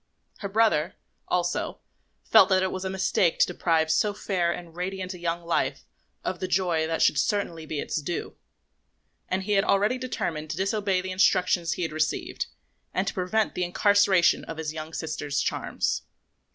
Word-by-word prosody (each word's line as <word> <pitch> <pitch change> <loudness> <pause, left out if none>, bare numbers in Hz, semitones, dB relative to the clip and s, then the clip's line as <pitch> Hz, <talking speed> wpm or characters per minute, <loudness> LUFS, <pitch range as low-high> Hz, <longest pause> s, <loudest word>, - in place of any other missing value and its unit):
Her 200 - -4
brother, 195 -5 +2 0.3
also, 175 -1 -1 0.4
felt - - +6
that 190 -1 +3
it 190 - 0
was 185 - -4
a 190 - -2
mistake 190 -2 +1
to - - +5
deprive 165 -3 +1
so 205 +5 +2
fair 180 -5 0
and 170 -1 -7
radiant 185 +1 -4
a 180 - -10
young 170 0 -2
life 170 - -1 0.4
of 185 - -3
the 185 - -2
joy 175 -3 +1
that 165 0 +1
should 145 - +4
certainly 170 -5 -1
be 155 -2 -3
its 155 - -2
due; 170 +3 -4 0.9
and 190 +1 -1
he 210 - -3
had 195 -1 +4
already 210 +6 +2
determined 160 -11 -3
to - - -4
disobey 195 -1 0
the 190 0 -5
instructions 180 -3 +2
he 180 - -3
had 165 - -2
received 155 0 -2 0.5
and 185 - +1
to - - -2
prevent 200 +4 0
the 180 - -1
incarceration 195 0 +4
of 165 - -7
his 155 -1 -3
young 155 0 -6
sister's 155 -3 -3
charms. - - -1
180 Hz, 180 wpm, -26 LUFS, 165-195 Hz, 0.9 s, felt